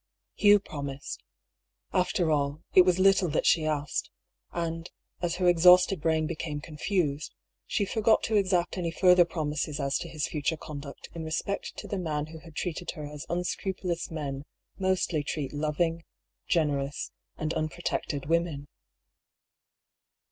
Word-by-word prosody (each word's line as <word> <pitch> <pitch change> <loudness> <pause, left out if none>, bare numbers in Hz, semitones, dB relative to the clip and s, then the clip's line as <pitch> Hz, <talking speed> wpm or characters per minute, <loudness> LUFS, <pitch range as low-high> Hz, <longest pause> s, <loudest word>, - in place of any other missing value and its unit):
Hugh 205 0 +6
promised. 140 -6 -6 0.7
After 180 -2 +2
all, 145 +1 0
it 185 - +9
was 180 -1 +3
little 190 -1 +4
that 150 - 0
she 160 -2 +4
asked; 150 -2 -1 0.4
and, 165 0 -3 0.3
as 175 -2 0
her 180 0 +1
exhausted 180 +1 +6
brain 160 -1 +2
became 155 -2 -3
confused, 150 -1 -2 0.3
she 205 - +1
forgot 220 +2 +3
to 220 - 0
exact 185 -2 +2
any 170 -2 -1
further 180 +1 +5
promises 150 -2 -2
as 140 -1 0
to 170 - -6
his 155 -3 -2
future 155 +1 -1
conduct 145 -2 -8
in 165 - -5
respect 160 +5 -3
to - - -6
the 200 - -2
man 150 -4 -1
who 160 - -8
had 160 -1 -14
treated 175 +1 -3
her 150 - -5
as 145 0 -8
unscrupulous 180 0 -2
men 145 -3 -4 0.3
mostly 185 -4 +1
treat 145 -1 -3
loving, 160 +3 0 0.4
generous, 145 -4 0 0.3
and 155 +1 -2
un 155 -1 -1
protected 140 0 -3
women. 165 -3 0
165 Hz, 145 wpm, -28 LUFS, 150-180 Hz, 0.7 s, it